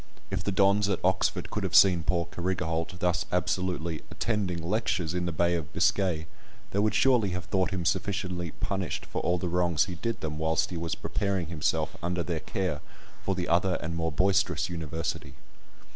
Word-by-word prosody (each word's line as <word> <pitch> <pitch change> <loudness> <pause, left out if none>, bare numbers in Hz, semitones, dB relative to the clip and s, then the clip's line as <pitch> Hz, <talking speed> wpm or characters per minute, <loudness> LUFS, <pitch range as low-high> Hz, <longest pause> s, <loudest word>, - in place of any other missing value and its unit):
If - - -1
the 100 - 0
dons 100 +1 +4
at 95 - +2
Oxford 95 +1 +1
could - - -2
have - - -1
seen 90 -4 +7
poor 85 +1 +1
Carrigaholt 85 -1 -2
thus 90 -1 0
absolutely 90 -2 -1
"attending 100 -6 -1
lectures" 90 -5 0
in 90 -1 -1
the - - 0
Bay 85 +2 +2
of 80 -4 -3
Biscay, 90 -5 +2 0.5
they 100 - 0
would 105 +1 +2
surely 125 -6 +4
have 90 - -6
thought 95 -1 +1
him 95 -4 -3
sufficiently 90 -4 -1
punished 95 -2 -3
for - - -3
all 90 - +1
the 90 - -2
wrongs 85 -2 +2
he 95 - -5
did 115 +7 -3
them 75 -1 -3
whilst 80 +2 +1
he 85 - -3
was 80 -2 -2
preparing 95 -3 -1
himself 80 -3 0
under 85 0 -1
their 85 -1 -2
care 90 -6 -2 0.4
for 95 - 0
the 90 -1 -2
other 90 +2 +2
and 85 +1 -4
more 80 0 -1
boisterous 95 +1 +2
University. 80 -1 -4
90 Hz, 185 wpm, -28 LUFS, 85-95 Hz, 0.5 s, seen